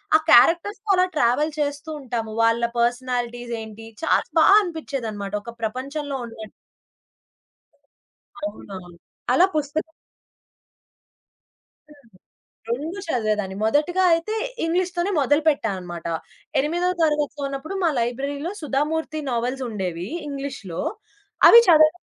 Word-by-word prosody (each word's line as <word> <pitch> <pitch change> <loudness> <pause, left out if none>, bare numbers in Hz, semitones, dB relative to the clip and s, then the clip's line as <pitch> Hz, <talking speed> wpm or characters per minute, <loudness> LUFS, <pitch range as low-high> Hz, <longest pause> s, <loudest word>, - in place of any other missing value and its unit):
ఆ - - +10
క్యారెక్టర్స్‌తో 345 - +4
అలా 365 0 +4
ట్రావెల్ 295 +4 +2
చేస్తూ 290 +1 -2
ఉంటాము. 230 -4 -4
వాళ్ళ 230 +1 +2 0.2
పర్సనాలిటీస్ 245 0 -1
ఏంటి 220 +1 -10 0.2
చాలా 325 - +3 0.2
బాగా 385 +6 +7
అనిపించేదన్నమాట. 240 - -5
ఒక 235 - -8
ప్రపంచంలో 275 +5 -3
ఉన్న 230 - -12 2.1
అవునవును. 185 - -9 0.4
అలా 345 +8 +6
పుస్తకం 305 +2 -2 2.0
హ్మ్. 285 -4 -19 0.6
2 310 +11 -3
చదివేదాన్ని. 215 -8 -1
మొదటిగా 300 +11 +2
అయితే 335 +6 -2 0.3
ఇంగ్లీష్ 360 +2 0
తోనే 350 +3 0
మొదలు 290 +3 +2
పెట్టా 280 -7 +1
అన్నమాట. 175 -2 -8 0.5
ఎనిమిదో 345 +5 0
తరగతిలో 295 -2 0
ఉన్నప్పుడు 275 +7 -6
మా 335 - +4
లైబ్రరీ‌లో 280 +7 -2
'సుధామూర్తి' 310 +2 -1
నోవెల్స్ 250 +3 -2
ఉండేవి 180 -4 -4 0.2
ఇంగ్లీష్‌లో 275 - -5 0.7
అవి 470 - +10
చదవడం 310 +1 +6
275 Hz, 105 wpm, -23 LUFS, 235-315 Hz, 2.1 s, ఆ